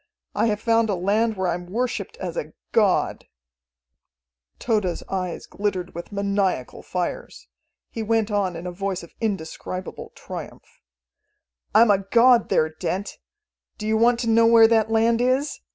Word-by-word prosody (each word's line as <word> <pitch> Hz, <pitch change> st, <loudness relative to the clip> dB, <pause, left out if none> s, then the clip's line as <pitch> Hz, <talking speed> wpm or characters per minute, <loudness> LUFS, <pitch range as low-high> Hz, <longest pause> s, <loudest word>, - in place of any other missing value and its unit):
I -, -, +1 dB
have 210 Hz, -1 st, 0 dB
found 230 Hz, 0 st, +2 dB
a 200 Hz, -, +1 dB
land 210 Hz, +4 st, +1 dB
where 190 Hz, -1 st, 0 dB
I -, -, +1 dB
am 175 Hz, +1 st, -6 dB
worshipped 250 Hz, -, -3 dB
as -, -, -5 dB
a -, -, -5 dB, 0.2 s
god." 205 Hz, -5 st, +1 dB, 1.3 s
Tode's 210 Hz, -7 st, -1 dB
eyes 185 Hz, -2 st, -4 dB
glittered 190 Hz, -3 st, -3 dB
with 170 Hz, +4 st, -8 dB
maniacal 200 Hz, -8 st, -1 dB
fires. 180 Hz, -1 st, -5 dB, 0.4 s
He 225 Hz, -, -5 dB
went 220 Hz, 0 st, 0 dB
on 195 Hz, -4 st, 0 dB
in 165 Hz, +2 st, -7 dB
a 180 Hz, -, -3 dB
voice 190 Hz, 0 st, -3 dB
of 170 Hz, -, -14 dB
indescribable 185 Hz, -2 st, -4 dB
triumph: -, -, -10 dB, 0.9 s
"I'm 220 Hz, 0 st, +7 dB
a 195 Hz, -, +3 dB
god 235 Hz, +5 st, +4 dB
there, 155 Hz, -, +3 dB
Dent. 180 Hz, +5 st, -4 dB, 0.6 s
Do 215 Hz, -, -6 dB
you 220 Hz, 0 st, +1 dB
want 235 Hz, +2 st, +3 dB
to 235 Hz, -, -2 dB
know 230 Hz, 0 st, +5 dB
where 230 Hz, -1 st, +7 dB
that 225 Hz, -1 st, +2 dB
land 230 Hz, +1 st, +2 dB
is? 260 Hz, +4 st, 0 dB
210 Hz, 155 wpm, -23 LUFS, 185-230 Hz, 1.3 s, I'm